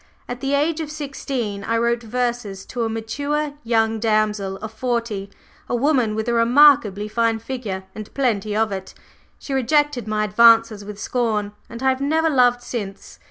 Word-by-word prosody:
At 245 Hz, 0 st, -5 dB
the 275 Hz, +1 st, 0 dB
age 305 Hz, +3 st, +1 dB
of 315 Hz, -2 st, -4 dB
sixteen 270 Hz, -8 st, -4 dB
I 230 Hz, +3 st, 0 dB
wrote 235 Hz, +1 st, +1 dB
verses 235 Hz, -4 st, -3 dB
to 245 Hz, -2 st, -3 dB
a -, -, -1 dB
mature 285 Hz, +7 st, -2 dB
young 225 Hz, -1 st, +1 dB
damsel 210 Hz, -3 st, 0 dB
of 220 Hz, +2 st, -8 dB
forty, 230 Hz, -4 st, -2 dB, 0.4 s
a -, -, 0 dB
woman 250 Hz, -4 st, +2 dB
with 220 Hz, +1 st, -3 dB
a 240 Hz, -, +1 dB
remarkably 235 Hz, -4 st, +5 dB
fine 230 Hz, +1 st, +1 dB
figure 225 Hz, -5 st, -5 dB
and 215 Hz, -1 st, -8 dB
plenty 215 Hz, -6 st, 0 dB
of 220 Hz, -1 st, +1 dB
it; 190 Hz, -1 st, -6 dB, 0.4 s
she 275 Hz, -, -7 dB
rejected 270 Hz, -2 st, +1 dB
my 215 Hz, 0 st, 0 dB
advances 225 Hz, 0 st, +5 dB
with 205 Hz, 0 st, -9 dB
scorn, 215 Hz, -4 st, -1 dB, 0.2 s
and 235 Hz, +2 st, -8 dB
I 265 Hz, -, +4 dB
have 260 Hz, 0 st, 0 dB
never 320 Hz, +3 st, +2 dB
loved 245 Hz, -2 st, +3 dB
since!" 205 Hz, -6 st, -6 dB
230 Hz, 170 wpm, -21 LUFS, 215-260 Hz, 0.4 s, remarkably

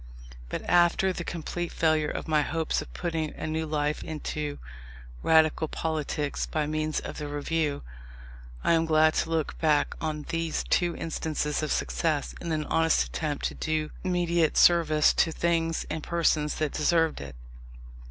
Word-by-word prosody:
But, -, -, -4 dB
after 175 Hz, +2 st, +4 dB
the 175 Hz, -, -5 dB
complete 170 Hz, +1 st, -4 dB
failure 155 Hz, -2 st, +2 dB
of -, -, -5 dB
my 155 Hz, -1 st, +3 dB
hopes 160 Hz, +2 st, -1 dB
of -, -, -10 dB
putting 160 Hz, -3 st, -3 dB
a -, -, -5 dB
new 160 Hz, 0 st, -2 dB
life 150 Hz, 0 st, -1 dB
into 150 Hz, -1 st, -4 dB, 0.6 s
Radical 160 Hz, 0 st, +4 dB
politics 150 Hz, -2 st, -2 dB
by 155 Hz, -1 st, -1 dB
means 155 Hz, +1 st, -1 dB
of -, -, -7 dB
the 150 Hz, -, -4 dB
Review, 145 Hz, 0 st, -1 dB, 0.8 s
I -, -, +3 dB
am 165 Hz, 0 st, +2 dB
glad 155 Hz, 0 st, +4 dB
to -, -, 0 dB
look 160 Hz, -2 st, -1 dB
back 150 Hz, -2 st, +2 dB
on 150 Hz, -2 st, -3 dB
these 165 Hz, -1 st, -1 dB
two 175 Hz, -1 st, +1 dB
instances 155 Hz, -2 st, -2 dB
of 155 Hz, -, -2 dB
success -, -, -1 dB
in 170 Hz, -, -4 dB
an 155 Hz, -1 st, -1 dB
honest 165 Hz, +1 st, +3 dB
attempt 150 Hz, -3 st, -3 dB
to -, -, -10 dB
do 155 Hz, -1 st, -2 dB
mediate 175 Hz, -3 st, +1 dB
service 155 Hz, -3 st, +5 dB
to 165 Hz, -, +2 dB
things 165 Hz, 0 st, 0 dB
and 160 Hz, -, -4 dB
persons 155 Hz, -2 st, +1 dB
that 155 Hz, -2 st, -2 dB
deserved 165 Hz, -, +2 dB
it. 70 Hz, -2 st, -8 dB
155 Hz, 160 wpm, -27 LUFS, 150-165 Hz, 0.8 s, service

